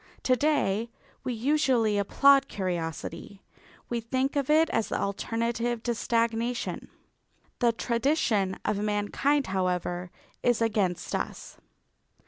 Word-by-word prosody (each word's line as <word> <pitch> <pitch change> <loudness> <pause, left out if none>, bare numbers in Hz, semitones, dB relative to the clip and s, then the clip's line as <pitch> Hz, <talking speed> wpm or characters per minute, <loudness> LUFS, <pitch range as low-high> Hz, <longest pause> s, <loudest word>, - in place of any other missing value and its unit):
To 255 - +4
day 235 -6 +1 0.3
we - - -2
usually 245 -5 +2
applaud 275 +7 +5
curiosity; 175 - -4 0.4
we 235 -1 -2
think 260 +5 -1
of 280 -1 0
it 315 +2 +5
as 225 - 0
the - - -1
alternative 230 +3 -2
to 240 - 0
stagnation. 230 +1 -1 0.7
The 240 -2 +4
tradition 230 -5 0
of 210 -1 0
mankind, 210 +7 +1
however, 180 -1 -1 0.3
is 245 -2 +2
against 210 -6 0
us. - - -4
230 Hz, 110 wpm, -28 LUFS, 200-255 Hz, 0.7 s, applaud